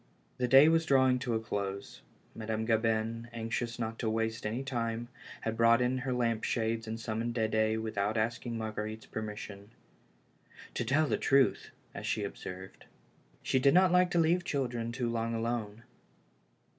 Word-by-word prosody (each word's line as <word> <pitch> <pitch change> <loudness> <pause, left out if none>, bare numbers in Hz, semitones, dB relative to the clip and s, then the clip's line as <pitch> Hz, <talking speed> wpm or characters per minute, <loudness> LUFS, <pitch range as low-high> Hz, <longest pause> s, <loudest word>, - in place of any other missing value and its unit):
The 125 - +1
day 135 +4 +8
was 165 0 +3
drawing 130 -2 +4
to 125 -2 -1
a - - +1
close. 100 -3 -4 0.3
Madame 110 0 -3
Gabin, 115 0 0
anxious 115 0 -3
not 115 -1 -4
to 115 - 0
waste 110 0 -1
any 115 +5 -3
time, 120 -3 -3 0.3
had 115 0 -2
brought 115 +1 +5
in 125 +1 +1
her 130 0 -3
lamp 115 -3 0
shades 115 -1 -1
and 110 +1 -4
summoned 115 +1 -3
Dede 110 -1 +1
without 110 0 -1
asking 115 +1 -1
Marguer 110 -1 -3
ite's 110 0 -10
permission. 105 -2 -7 0.5
" - - -21
To - - -1
tell 155 +3 +2
the - - 0
truth," 135 -1 +2 0.2
as - - -6
she - - 0
observed, 95 +1 -8 0.6
"she 130 - +2
did 140 +4 +4
not 185 0 +6
like 180 0 +4
to 175 - +1
leave 170 +2 +3
children 120 -7 -2
too 120 0 -2
long 115 0 -1
alone." 115 -1 -3
115 Hz, 170 wpm, -31 LUFS, 110-125 Hz, 0.6 s, day